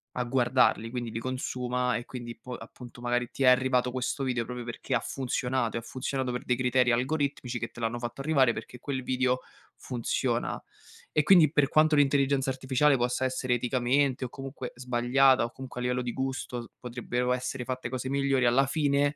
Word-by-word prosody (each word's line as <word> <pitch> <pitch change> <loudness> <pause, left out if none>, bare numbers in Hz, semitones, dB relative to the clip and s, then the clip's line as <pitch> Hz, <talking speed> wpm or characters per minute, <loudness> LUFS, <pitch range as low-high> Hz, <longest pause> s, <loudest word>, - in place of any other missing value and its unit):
a 125 -1 -1
guardarli, 120 -2 +2
quindi 120 -2 -3
li 110 - -5
consuma 125 0 -2
e 120 - -3
quindi 120 -2 -7
po 125 +2 -8
appunto 120 +1 -11
magari 120 0 -1
ti - - -8
è - - +5
arrivato 125 0 +4
questo 130 +2 -2
video 125 -3 0
proprio 125 0 -6
perché 120 +2 -5
ha 120 - +3
funzionato, 125 -2 -2
e - - 0
ha - - -9
funzionato 130 +1 -3
per 125 - -4
dei 125 - +2
criteri 125 0 +2
algoritmici 130 -1 -1
che 115 0 -4
te - - -12
l'hanno 115 +1 -1
fatto 120 +3 -5
arrivare, 135 -5 +3
perché 125 - -8
quel 130 -1 -3
video 130 0 +1 0.4
funziona. 120 -3 -2 0.5
E 150 - +2
quindi, 160 -3 +6
per 150 -4 +3
quanto 155 +1 +4
l'intelligenza 140 -1 +3
artificiale 130 +2 +2
possa 125 +1 0
essere 130 -1 0
eticamente 130 +2 +1
o - - -6
comunque 135 -1 -7
sbagliata 125 +1 +3
o 120 - -6
comunque, 130 -2 -8
a - - -3
livello 125 0 0
di 120 - -3
gusto, 130 -2 -3
s 115 - -10
potrebbero 125 0 -2
essere 125 0 -3
fatte 130 0 -4
cose 130 0 -4
migliori, 140 -2 +2
alla 130 +3 +4
fine, 145 -1 +1
125 Hz, 190 wpm, -28 LUFS, 120-135 Hz, 0.5 s, quindi